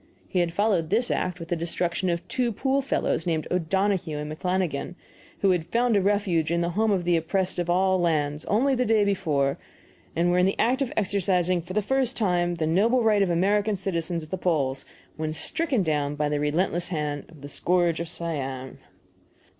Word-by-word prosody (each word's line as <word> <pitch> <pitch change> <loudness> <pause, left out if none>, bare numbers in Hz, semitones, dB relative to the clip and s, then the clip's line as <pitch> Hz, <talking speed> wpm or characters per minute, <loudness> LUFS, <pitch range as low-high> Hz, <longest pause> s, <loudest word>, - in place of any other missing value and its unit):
He 185 - -1
had 175 -1 +1
followed 190 -4 +1
this 230 +5 +1
act 180 -1 -1
with 165 0 -8
the 175 - +1
destruction 170 +2 -1
of 170 +1 -2
two 245 +2 0
pool 270 +5 0
fellows, 260 -9 -1
named 160 -2 0
O'Donohue 180 -2 0
and 150 +1 -5
McFlannigan, 180 -1 -2 0.5
who 195 - +4
had 175 -3 0
"found 235 +4 +2
a 200 - +4
refuge 190 -5 +1
in 170 0 +1
the 170 0 -1
home 220 +5 +1
of 190 -4 +1
the 175 0 +2
oppressed 180 +3 -1
of 175 0 -2
all 185 +1 +3
lands 150 -3 0
only 260 +7 +2
the 250 -1 +1
day 220 -3 +3
before, 150 -9 0 0.6
and 175 +1 +2
were 180 - +3
in 180 - +4
the 195 - -1
act 255 +4 +2
of 265 - -1
exercising 185 -3 +1
for 175 +3 -8
the 210 +1 +1
first 265 +2 0
time 175 -5 +1
the 160 -2 -1
noble 220 +10 +3
right 215 -2 +3
of 195 - +2
American 200 +5 +2
citizens 170 -3 -2
at 155 - -12
the 190 - -3
polls, 140 -7 0 0.3
when 155 0 -2
stricken 270 - 0
down 150 -3 -1
by 150 0 0
the 145 0 0
relentless 170 +4 0
hand 150 -4 -3
of 160 -4 -16
the 145 - -7
Scourge 175 +2 +1
of 170 -1 -3
Siam." 135 -7 -4
175 Hz, 200 wpm, -25 LUFS, 160-200 Hz, 0.6 s, who